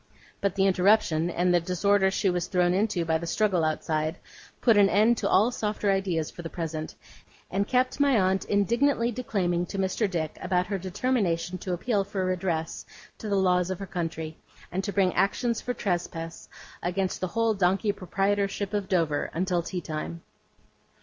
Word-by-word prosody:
But 200 -2 0
the 195 -1 +3
interruption, 185 -3 +3
and 180 +1 +1
the 175 - +5
disorder 190 +3 +2
she 195 +1 0
was 175 -2 0
thrown 180 -1 +2
into 195 -3 0
by 160 0 +1
the 170 - -6
struggle 190 -2 +1
outside, 155 0 -1 0.4
put 230 -3 +4
an 200 -1 +6
end 215 +5 +4
to - - -1
all 215 +6 +4
softer 210 -3 -1
ideas 185 -5 -1
for - - -9
the 165 - -6
present, 160 -2 -5 0.6
and 200 +2 0
kept 255 +2 +1
my 280 -5 +4
aunt 190 0 +2
indignantly 235 +4 +2
declaiming 185 -7 -1
to 195 - -6
Mr. 195 +2 0
Dick 160 -4 -3
about 180 -1 +1
her 195 0 -3
determination 185 -3 -1
to 185 - -3
appeal 200 +3 0
for 195 -1 -3
redress 175 -3 -2 0.4
to 215 - -5
the 200 - +1
laws 180 -2 +2
of 185 - -2
her 195 - -6
country, 165 -3 -4 0.3
and 190 +2 -2
to 200 - -2
bring 190 -2 +2
actions 230 +4 +1
for 250 - -3
trespass 170 -4 -3 0.3
against 185 +2 -2
the 185 - 0
whole 230 +4 +1
donkey 195 +2 +2
proprietorship 200 +1 -1
of 205 -2 -2
Dover, 165 -6 +1
until 180 0 +1
tea 180 +1 -4
time. 165 +1 -5
190 Hz, 175 wpm, -27 LUFS, 175-205 Hz, 0.6 s, an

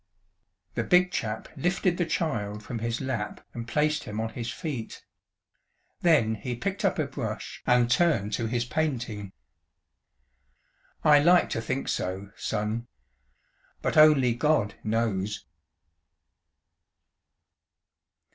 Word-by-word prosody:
The - - -1
Big 180 0 +4
Chap 110 -2 -3
lifted 180 0 +1
the 175 - +1
child 105 -12 -2
from 115 +2 -5
his 115 +1 -2
lap 120 -6 -4
and 115 -1 -6
placed 150 +3 +1
him 105 +1 -5
on 110 0 -1
his 115 +1 -5
feet. 140 -10 -6 0.9
Then 150 -11 +4
he 115 +3 -4
picked 200 - -3
up 195 - +2
a 155 - +1
brush 130 -1 -5
and 125 -1 +4
turned 120 - +2
to 115 +2 -1
his 120 +1 -1
painting. 120 -8 -2 1.7
"I 150 -1 +7
like 175 +4 +4
to 115 - -1
think 135 +4 -3
so, 95 +2 -3
Son. 110 +2 -2 1.0
But - - 0
only 150 -6 +6
God 120 -5 +1
knows." 105 - -1
120 Hz, 120 wpm, -27 LUFS, 110-155 Hz, 1.7 s, I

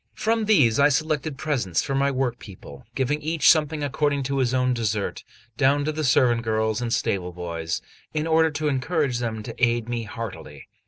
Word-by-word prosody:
From 225 0 0
these 140 - +4
I 140 +1 +6
selected 155 -1 -1
presents 130 - -1
for 135 - -3
my 140 +1 +2
workpeople, 125 -4 -5
giving 145 +3 0
each 160 +1 +4
something 155 -1 0
according 145 0 0
to 135 +1 -1
his 125 -2 +1
own 125 -1 +1
desert, 110 -4 -2 0.3
down 145 +1 +3
to 155 - 0
the 155 0 -3
servant 125 -3 +3
girls 110 0 0
and 120 -1 -2
stable 95 -5 -1
boys, 85 -2 -4 0.3
in 155 0 -2
order 160 0 +3
to 155 0 -2
encourage 140 -2 0
them 110 -3 -3
to 115 - -7
aid 120 -1 +2
me 120 -1 -3
heartily. 110 -1 -8
130 Hz, 180 wpm, -24 LUFS, 115-150 Hz, 0.3 s, I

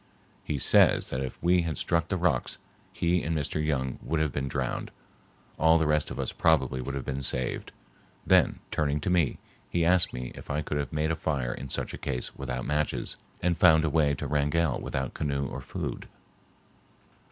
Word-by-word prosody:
He 75 - -2
says - - +4
that 65 - -2
if 65 - -5
we 90 +1 +4
had 80 -4 -3
struck 85 -1 +1
the 95 - -1
rocks 85 -9 0 0.3
he 85 0 +1
and 80 0 -1
Mr. 75 +1 -1
Young 65 -4 -1
would 80 0 -1
have 80 -2 +1
been 70 +1 -2
drowned, - - -2 0.7
all 80 +1 +6
the 80 - +1
rest 75 0 +1
of - - -6
us - - -1
probably 65 -5 +2
would 70 +2 -4
have 70 - -4
been 70 0 -3
saved. 65 -1 -2 0.5
Then, - - +4
turning 75 -1 0
to 90 - -1
me, 85 -7 +2 0.3
he 85 -1 +1
asked 90 +1 +4
me 60 0 -5
if - - -12
I 75 +1 -1
could 75 - -2
have 70 - -3
made 75 +1 0
a - - 0
fire 65 -7 -1
in 70 +1 -7
such - - -2
a - - -7
case 65 -3 -1
without 65 +1 -4
matches, 75 0 -1 0.3
and 90 0 +2
found 80 -3 +5
a 75 - 0
way 75 -2 +3
to - - -5
Wrangell 75 0 +1
without 65 -1 -3
canoe 70 -2 -1
or - - -5
food. - - -5
75 Hz, 200 wpm, -28 LUFS, 70-80 Hz, 0.7 s, all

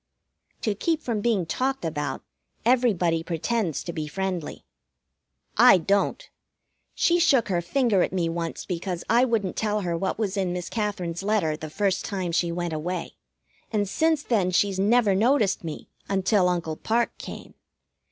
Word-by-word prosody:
To 215 - 0
keep 315 - -1
from 225 -4 -1
being 210 -6 +1
talked 260 +7 -1
about, 145 -4 -3 0.4
everybody 205 -10 +3
pretends 175 - -2
to 170 - -5
be 155 -2 -4
friendly. 185 0 -4 0.9
I - - +8
don't. 200 - 0 0.7
She 345 0 +3
shook 275 -10 +3
her 175 -2 +1
finger 225 +1 +2
at - - +1
me 180 -3 0
once 165 0 -4
because 180 -1 -4
I 240 +2 +5
wouldn't 220 -7 -1
tell 210 -1 0
her 175 -3 -1
what 190 +3 -2
was 205 -2 -2
in 185 -2 0
Miss 180 -2 -4
Katherine's 200 -6 -2
letter 195 -7 +1
the 155 0 -7
first 195 +4 0
time 190 -4 -3
she 170 0 +1
went 175 -1 -3
away, 170 +3 -3 0.6
and 205 -2 0
since 315 +7 +1
then 200 -7 +1
she's 190 +1 +1
never 210 +1 +4
noticed 220 -1 +2
me 160 -2 -6 0.2
until 195 -1 +2
Uncle 165 -3 -2
Parke 235 +2 0
came. - - -9
190 Hz, 160 wpm, -25 LUFS, 170-225 Hz, 0.9 s, I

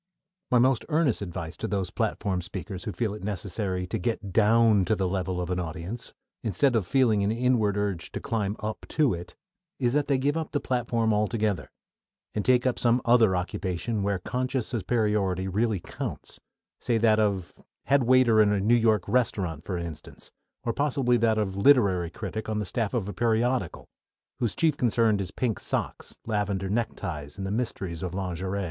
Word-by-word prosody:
My 125 - +4
most 130 0 +3
earnest 150 -8 +2
advice 85 -4 -5
to - - -3
those 95 -2 -2
platform 95 -3 -1
speakers 95 +2 -7
who 105 - -2
feel 105 +3 -2
it 105 - -8
necessary 95 -1 -3
to 90 - -3
"get 100 -1 -3
down 110 -1 +5
to 110 - +2
the 95 -2 0
level" 90 -1 -2
of 90 0 -3
an 90 - 0
audience, 85 +7 -5 0.3
instead 120 +5 +2
of 105 -6 +1
feeling 115 -7 +3
an 100 - +1
inward 115 -4 +1
urge 100 -5 -2
to - - -3
climb 105 -3 -2
up 105 +1 -5
to 150 -7 +2
it, 85 0 -7 0.4
is 120 -2 +1
that 145 0 +1
they 140 -2 +2
give 140 +3 0
up 160 -1 -3
the 145 - +1
platform 115 -4 0
altogether, 105 -2 0 0.6
and 105 - -1
take 125 +1 +3
up 130 - +1
some 120 0 +3
other 115 -5 +5
occupation 95 +4 -2
where 100 0 0
conscious 125 +5 -2
superiority 105 -4 0
really 105 +1 0
counts; - - -6 0.4
say 120 - +1
that 110 -1 +4
of 100 -4 -1 0.2
head 140 +1 +4
waiter 120 -3 +5
in 105 -1 +4
a 105 - +1
New 105 +5 +3
York 110 -5 +3
restaurant, 95 - 0
for 90 -1 -3
instance, 85 -3 -8 0.3
or 115 - -1
possibly 135 -3 +1
that 115 -2 +2
of 100 -3 -1
literary 100 -7 +4
critic 110 +4 -5
on 110 - -1
the 105 - -1
staff 110 +5 -2
of 105 -5 -1
a 105 - -4
periodical, 120 +4 0 0.5
whose 120 -4 -1
chief 160 -3 +2
concern 115 -3 +2
is 95 -2 -3
pink 115 +3 -2
socks, - - -4
lavender 100 -3 -1
neckties, 90 -10 -3
and 95 - -4
the 95 - -3
mysteries 95 -7 -3
of 90 -1 -4
lingerie. 95 +1 -3
105 Hz, 185 wpm, -27 LUFS, 95-120 Hz, 0.6 s, down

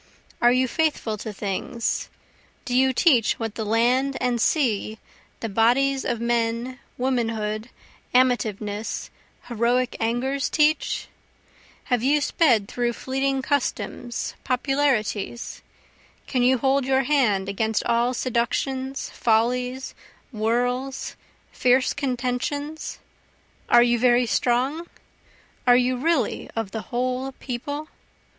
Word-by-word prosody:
Are 240 0 +6
you 255 +1 +2
faithful 295 -6 0
to 220 - -5
things? 210 +4 -3 0.6
do 245 - -2
you 260 +1 +4
teach 255 - +4
what 225 -2 -4
the 220 - -4
land 245 +5 +2
and 245 -2 0
sea, 220 -8 +1 0.4
the 225 - -2
bodies 250 +6 +2
of 235 - -1
men, 235 +1 -1 0.2
womanhood, 230 -3 -1 0.4
amativeness, 220 -4 0 0.3
heroic 245 +2 0
angers, 250 +5 0
teach? 305 +1 +1 0.8
Have 245 -3 0
you 285 +4 +3
sped 255 -8 +2
through 240 +1 -1
fleeting 270 +2 -1
customs, 250 -3 -2
popularities? 250 -4 -1 0.6
Can 255 - -1
you 255 +1 +4
hold 270 +2 +2
your 265 +1 +2
hand 240 -9 +2
against 220 +2 0
all 235 +2 +1
seductions, 260 +3 -1
follies, 250 +3 0 0.4
whirls, 245 +4 -1 0.4
fierce 255 +1 +2
contentions? 280 +3 -3 0.7
are 240 - +7
you 240 -1 +2
very 245 0 +4
strong? 260 +8 0 0.8
are 245 0 +7
you 250 +1 +2
really 275 -2 0
of 225 -4 -3
the 220 - -4
whole 255 +2 -2
People? 285 +5 -5
245 Hz, 110 wpm, -24 LUFS, 230-265 Hz, 0.8 s, are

